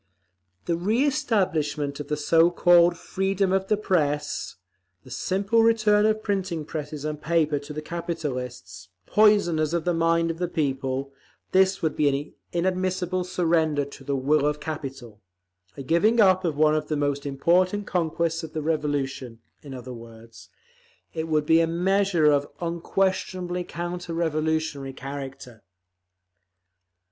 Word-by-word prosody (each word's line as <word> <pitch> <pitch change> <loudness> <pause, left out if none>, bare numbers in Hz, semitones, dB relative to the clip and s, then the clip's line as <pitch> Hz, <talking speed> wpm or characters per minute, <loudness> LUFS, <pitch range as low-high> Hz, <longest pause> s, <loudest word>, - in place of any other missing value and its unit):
The 170 - 0
reëstablishment 190 - 0
of 145 - -6
the 150 - -2
so 165 +3 +4
called 175 0 +4
"freedom 195 +1 -1
of 195 0 0
the 210 - +2
press," 150 -8 -1 0.5
the 130 - -15
simple 195 - +1
return 215 -2 +4
of 215 0 0
printing 185 -6 -2
presses 150 -1 -6
and 150 -1 -4
paper 155 -2 +1
to 145 +2 -10
the 155 +1 -5
capitalists,—poisoners 155 - 0
of 170 - -2
the 175 - +2
mind 165 0 +2
of 165 - -8
the 180 - 0
people—this 140 +6 -1
would 160 - 0
be 145 -1 +3
an 145 - -10 0.2
inadmissible 185 0 -1
surrender 160 -5 +1
to 140 - -12
the 140 - -2
will 145 +2 +2
of 150 0 -1
capital, 135 -8 -7 0.6
a 140 - -6
giving 175 - +2
up 185 -3 +5
of 155 -4 -1
one 155 0 +4
of 155 -1 -1
the 155 - -1
most 145 0 -1
important 180 +8 +1
conquests 165 -2 -1
of 160 -2 -9
the 155 -2 -3
Revolution; 145 -6 -2 0.2
in 140 -3 -9
other 125 0 -8
words, 115 -1 -13 0.6
it 160 0 -3
would 155 -2 +1
be 160 +2 +5
a 165 - +2
measure 185 0 +1
of 145 -1 +3
unquestionably 180 +1 -1
counter 175 0 -5
revolutionary 155 -4 -1
character. 135 -3 -8
160 Hz, 140 wpm, -25 LUFS, 145-180 Hz, 0.6 s, up